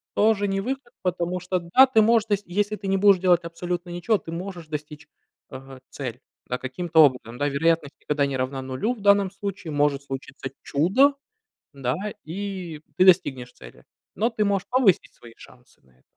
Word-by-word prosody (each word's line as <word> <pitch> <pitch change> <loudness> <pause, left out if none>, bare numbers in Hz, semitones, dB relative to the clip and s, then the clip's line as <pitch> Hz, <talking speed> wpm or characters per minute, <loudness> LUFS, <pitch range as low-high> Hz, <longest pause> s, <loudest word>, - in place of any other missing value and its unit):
тоже 205 -1 +3
не 195 0 -1
выход, 255 +1 -5
потому 180 0 -2
что, 180 +1 -2
да, 180 +11 +5
ты 225 -4 +4
можешь 225 0 +4
т 205 - +3
если 205 +4 -1
ты 200 -2 -7
не 195 0 +2
будешь 200 -1 +6
делать 175 -2 +3
абсолютно 175 +1 -4
ничего, 175 +5 0
ты 165 - -10
можешь 175 -1 -6
достичь, 150 0 -7 0.4
э, 135 -1 -10
цель, 125 -3 -6 0.3
да, 125 - -3
каким-то 160 +5 -1
образом. 125 -3 -2
Вероятность 145 +1 0
никогда 145 -1 0
не 135 -1 -3
равна 130 +1 -3
0 130 - -2
в 220 - -12
данном 200 -1 +4
случае. 195 -4 -6
Может 145 -1 +1
случиться 135 -1 -7
чудо, 250 - +3 0.6
да, 130 -2 -2 0.3
и 180 -2 -6 0.2
ты 185 - +5
достигнешь 135 -10 +3
цели, - - -15 0.3
но 225 +3 +2
ты 215 -2 -1
можешь 200 -2 0
повысить 245 -8 +2
свои 115 -1 -15
шансы 125 -1 -18
на 65 - -28
это. 65 0 -31
175 Hz, 180 wpm, -24 LUFS, 140-200 Hz, 0.6 s, будешь